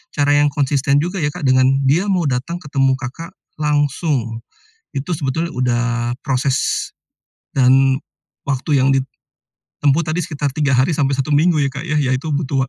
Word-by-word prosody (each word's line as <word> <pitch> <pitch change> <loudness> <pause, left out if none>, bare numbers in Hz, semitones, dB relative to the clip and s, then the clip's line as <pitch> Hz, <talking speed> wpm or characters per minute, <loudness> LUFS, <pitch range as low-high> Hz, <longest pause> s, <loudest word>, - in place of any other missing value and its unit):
cara 145 0 +2
yang 145 0 +4
konsisten 140 0 +1
juga 175 +5 -1
ya 145 - +1
Kak, 145 - -6
dengan 130 0 +4 0.2
dia 170 +10 +2
mau 180 -4 +1
datang 135 +6 -2
ketemu 135 -4 +1
Kakak, 135 +6 -7 0.3
langsung. 145 -5 0 0.5
Itu 140 +5 -3
sebetulnya 160 +2 -2
udah 120 -2 0 0.4
proses, 135 -1 0 0.6
dan 135 0 +4 0.5
waktu 140 +1 0
yang 135 +1 +3 0.7
ditempuh 145 +3 0
tadi, 155 +3 -1
sekitar 145 -4 -3
3 140 -2 +1
hari 130 +6 +2
sampai 140 -3 0
1 135 +2 -1
minggu, 160 +4 +3
ya 140 -2 +1
Kak 140 +3 -6
ya, 155 - 0
ya 135 -3 +1
itu 130 +5 -2
butuh 135 -3 -1
140 Hz, 160 wpm, -18 LUFS, 130-155 Hz, 0.7 s, yang